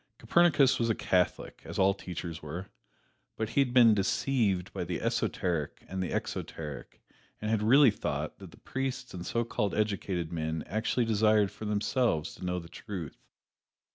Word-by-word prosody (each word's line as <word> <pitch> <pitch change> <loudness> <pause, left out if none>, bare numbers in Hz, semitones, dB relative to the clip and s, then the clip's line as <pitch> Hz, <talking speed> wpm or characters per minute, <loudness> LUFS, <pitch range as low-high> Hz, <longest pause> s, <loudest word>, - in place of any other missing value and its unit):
Copernicus 155 -6 +4
was 115 -1 +1
a 110 - +2
Catholic, 90 -1 0
as - - -7
all 95 +1 +4
teachers 85 -3 -6
were, 85 +6 -7 0.7
but 110 -1 -2
he 140 - +3
had 130 -3 +1
been 120 -3 +7
deceived 100 -2 +1
by - - -3
the - - -3
esoteric 85 -6 -1
and 95 0 -4
the 90 - -2
exoteric, 75 -3 -5 0.4
and 110 0 -2
had 110 -2 +2
really 130 +4 +6
thought 105 - -4
that - - -10
the - - -17
priests 130 -2 -4
and 90 -1 -6
so 115 - 0
called 105 -3 -1
educated 100 -5 -1
men 80 -1 -2
actually 110 +5 0
desired, 110 -2 +3
for 110 - -8
themselves, 105 - 0
to - - -12
know 90 0 -1
the 85 -2 -7
truth. 90 -2 -8
105 Hz, 170 wpm, -30 LUFS, 90-115 Hz, 0.7 s, been